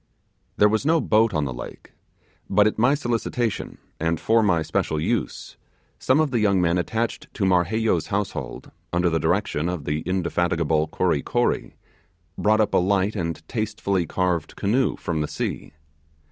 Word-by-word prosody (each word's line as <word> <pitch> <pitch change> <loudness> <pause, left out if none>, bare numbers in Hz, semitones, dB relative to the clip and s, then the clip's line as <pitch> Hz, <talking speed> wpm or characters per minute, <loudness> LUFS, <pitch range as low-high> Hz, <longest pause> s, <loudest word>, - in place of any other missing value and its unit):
There 105 - +6
was 110 +3 0
no 160 +3 +3
boat 110 -4 +3
on 75 -4 0
the 65 - -4
lake; - - -10 0.6
but 105 +1 +4
at 110 - 0
my 125 +5 +4
solicitation 120 -4 -2 0.2
and 80 0 0
for 115 +1 +3
my 85 -7 +2
special 80 0 -1
use, 75 - -3 0.4
some 130 +3 +2
of 155 -3 +1
the 120 - +1
young 100 -3 +3
men 90 0 +2
attached 110 +6 -3
to 100 - 0
Marheyo's 95 +1 +1
household, 95 - -4 0.2
under 85 0 +1
the 80 - +1
direction 85 -1 0
of 90 -5 -4
the 75 +1 -1
indefatigable 85 -3 0
Kory - - 0
Kory, - - -1 0.6
brought 110 +1 +3
up 105 -1 0
a - - +5
light 100 +3 +1
and 85 -3 -4
tastefully 105 -5 -1
carved 90 -3 -1
canoe 125 +7 +1
from 80 -3 -3
the 75 - -1
sea. - - -4
95 Hz, 160 wpm, -23 LUFS, 85-110 Hz, 0.6 s, There